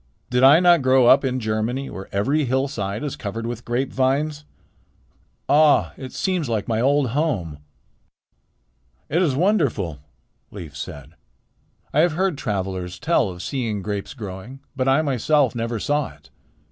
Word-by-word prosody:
"Did 125 Hz, 0 st, +2 dB
I 140 Hz, +4 st, +8 dB
not 175 Hz, -3 st, +5 dB
grow 130 Hz, -1 st, +4 dB
up 130 Hz, +4 st, +6 dB
in 130 Hz, -1 st, -1 dB
Germany, 110 Hz, +4 st, -2 dB
where 95 Hz, -, -8 dB
every 140 Hz, +10 st, +1 dB
hillside 120 Hz, -5 st, -2 dB
is 145 Hz, -, -3 dB
covered 110 Hz, +3 st, -5 dB
with 120 Hz, 0 st, -5 dB
grapevines? 135 Hz, +4 st, -1 dB, 1.0 s
Ah! 150 Hz, +1 st, +4 dB
it 130 Hz, -2 st, -8 dB
seems 180 Hz, -8 st, -1 dB
like 110 Hz, -3 st, -1 dB
my 110 Hz, -1 st, 0 dB
old 140 Hz, 0 st, +2 dB
home." 115 Hz, -, -1 dB, 1.5 s
"It 170 Hz, +5 st, +1 dB
is 150 Hz, -8 st, +1 dB
wonderful," 140 Hz, -, +1 dB, 0.5 s
Leif 85 Hz, -8 st, -9 dB
said. 75 Hz, -1 st, -8 dB, 0.8 s
"I 145 Hz, -, +2 dB
have 165 Hz, 0 st, +4 dB
heard 185 Hz, 0 st, 0 dB
travelers 95 Hz, -7 st, -3 dB
tell 130 Hz, -, +1 dB
of 90 Hz, 0 st, -8 dB
seeing 115 Hz, -7 st, -3 dB
grapes 100 Hz, +3 st, -4 dB
growing, 105 Hz, +3 st, -8 dB, 0.2 s
but 130 Hz, -1 st, -1 dB
I 135 Hz, +4 st, +3 dB
myself 140 Hz, -1 st, +2 dB
never 115 Hz, -1 st, -3 dB
saw 145 Hz, +4 st, 0 dB
it. -, -, -23 dB
130 Hz, 145 wpm, -22 LUFS, 105-145 Hz, 1.5 s, I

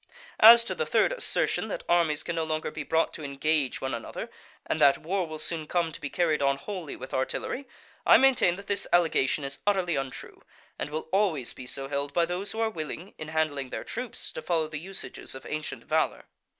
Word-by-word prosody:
As 230 Hz, +2 st, +10 dB
to 235 Hz, -, -3 dB
the 475 Hz, -, -2 dB
third -, -, +3 dB
assertion, -, -, +2 dB
that -, -, -5 dB
armies 165 Hz, -3 st, +2 dB
can 170 Hz, -, -3 dB
no 165 Hz, -, 0 dB
longer 155 Hz, -1 st, -2 dB
be 155 Hz, -, -5 dB
brought 160 Hz, +3 st, +1 dB
to 155 Hz, -, -8 dB
engage 140 Hz, 0 st, 0 dB
one 135 Hz, -1 st, -2 dB
another, 115 Hz, -, -6 dB, 0.3 s
and -, -, -2 dB
that 140 Hz, -, +6 dB
war 180 Hz, +2 st, -2 dB
will 155 Hz, 0 st, -6 dB
soon 155 Hz, 0 st, 0 dB
come 170 Hz, -1 st, 0 dB
to -, -, -8 dB
be 145 Hz, -, -4 dB
carried 160 Hz, -3 st, +1 dB
on 140 Hz, 0 st, +2 dB
wholly 180 Hz, -2 st, -6 dB
with 130 Hz, -, -9 dB
artillery, 130 Hz, -, -2 dB, 0.4 s
I -, -, +8 dB
maintain 260 Hz, -10 st, +4 dB
that 200 Hz, +2 st, -10 dB
this 200 Hz, 0 st, 0 dB
allegation 160 Hz, -5 st, +3 dB
is 140 Hz, 0 st, -4 dB
utterly 185 Hz, -5 st, +2 dB
untrue, 135 Hz, -1 st, -6 dB, 0.4 s
and -, -, -3 dB
will 155 Hz, +2 st, -4 dB
always 180 Hz, -, +1 dB
be 130 Hz, -, -9 dB
so 135 Hz, +1 st, -1 dB
held 140 Hz, 0 st, -3 dB
by 170 Hz, +1 st, +3 dB
those 180 Hz, +4 st, -3 dB
who 220 Hz, -, -5 dB
are 225 Hz, -1 st, +2 dB
willing 165 Hz, +2 st, -6 dB
in 155 Hz, -, -6 dB
handling 155 Hz, -4 st, -1 dB
their -, -, -5 dB
troops 245 Hz, 0 st, -5 dB
to -, -, -6 dB
follow 160 Hz, -1 st, 0 dB
the 155 Hz, -1 st, -6 dB
usages 190 Hz, -4 st, -6 dB
of 130 Hz, -, -10 dB
ancient 155 Hz, 0 st, -4 dB
valour. -, -, 0 dB
160 Hz, 215 wpm, -28 LUFS, 145-185 Hz, 0.4 s, As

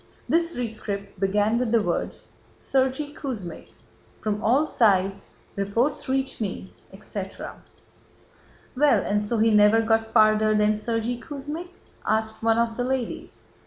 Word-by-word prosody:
This 335 Hz, -1 st, +1 dB
rescript 205 Hz, -4 st, -4 dB
began 205 Hz, +4 st, +2 dB
with 245 Hz, -3 st, -1 dB
the 230 Hz, -2 st, +3 dB
words: 175 Hz, -2 st, -3 dB, 0.3 s
"Sergéy 265 Hz, +2 st, 0 dB
Kuzmích, 205 Hz, -, -6 dB, 0.5 s
From 210 Hz, -1 st, -2 dB
all 265 Hz, +7 st, +3 dB
sides 195 Hz, -7 st, +2 dB, 0.3 s
reports 230 Hz, +9 st, -1 dB
reach 265 Hz, -2 st, -1 dB
me," 190 Hz, -2 st, -4 dB, 0.2 s
etc. 195 Hz, -1 st, -7 dB, 1.1 s
"Well, 260 Hz, -6 st, +4 dB
and 205 Hz, +1 st, +1 dB
so 210 Hz, +3 st, -1 dB
he 225 Hz, +1 st, +4 dB
never 210 Hz, +1 st, +6 dB
got 225 Hz, 0 st, +2 dB
farther 215 Hz, -1 st, +4 dB
than: 210 Hz, 0 st, +4 dB
'Sergéy 225 Hz, +2 st, -2 dB
Kuzmích'?" 295 Hz, +7 st, -6 dB, 0.3 s
asked 220 Hz, 0 st, -1 dB
one 225 Hz, 0 st, +3 dB
of 230 Hz, -1 st, 0 dB
the 245 Hz, -, 0 dB
ladies. 255 Hz, -1 st, -4 dB
225 Hz, 130 wpm, -25 LUFS, 210-255 Hz, 1.1 s, never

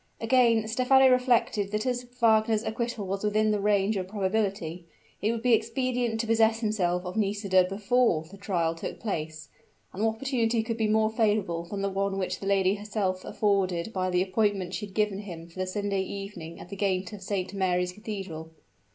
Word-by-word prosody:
Again 230 Hz, -2 st, +3 dB
Stephano 260 Hz, +3 st, +5 dB
reflected 245 Hz, -5 st, +2 dB
that 210 Hz, +2 st, -2 dB
as 250 Hz, -1 st, -1 dB
Wagner's 220 Hz, -1 st, +3 dB
acquittal 230 Hz, -2 st, -3 dB
was 195 Hz, +2 st, -3 dB
within 215 Hz, +1 st, +2 dB
the 210 Hz, -, +1 dB
range 205 Hz, +1 st, +2 dB
of 185 Hz, -1 st, -3 dB
probability, 190 Hz, -4 st, -2 dB, 0.3 s
it 215 Hz, -, +2 dB
would 230 Hz, -1 st, -4 dB
be 250 Hz, -1 st, +4 dB
expedient 235 Hz, 0 st, 0 dB
to 230 Hz, -, 0 dB
possess 225 Hz, 0 st, +3 dB
himself 185 Hz, -5 st, 0 dB
of 180 Hz, -, -5 dB
Nisida 200 Hz, -3 st, +2 dB
before 200 Hz, -2 st, +1 dB
the 175 Hz, +5 st, -14 dB
trial 180 Hz, -5 st, -1 dB
took 165 Hz, -, -6 dB
place; 155 Hz, -7 st, -4 dB, 0.4 s
and 200 Hz, -, -3 dB
what 220 Hz, 0 st, +2 dB
opportunity 235 Hz, -3 st, 0 dB
could 230 Hz, 0 st, -3 dB
be 220 Hz, -2 st, +1 dB
more 215 Hz, 0 st, +2 dB
favorable 210 Hz, -7 st, 0 dB
than 195 Hz, +3 st, -5 dB
the -, -, +1 dB
one 195 Hz, 0 st, -1 dB
which 185 Hz, -1 st, -2 dB
that 195 Hz, -, -5 dB
lady 195 Hz, -1 st, +3 dB
herself 205 Hz, -3 st, -2 dB
afforded 195 Hz, -1 st, 0 dB
by 185 Hz, -1 st, 0 dB
the 180 Hz, 0 st, +2 dB
appointment 195 Hz, -2 st, 0 dB
she 210 Hz, -, -4 dB
had 190 Hz, -, -18 dB
given 210 Hz, -2 st, +1 dB
him 170 Hz, -5 st, -8 dB
for 170 Hz, +2 st, -13 dB
the 185 Hz, -, -1 dB
Sunday 200 Hz, 0 st, -1 dB
evening 190 Hz, -4 st, -7 dB
at -, -, -11 dB
the 200 Hz, -, -6 dB
gate 190 Hz, 0 st, -1 dB
of 205 Hz, -, -8 dB
Saint 190 Hz, -1 st, -3 dB
Mary's 180 Hz, -2 st, 0 dB
Cathedral? 195 Hz, -6 st, -7 dB
205 Hz, 190 wpm, -27 LUFS, 185-220 Hz, 0.4 s, Stephano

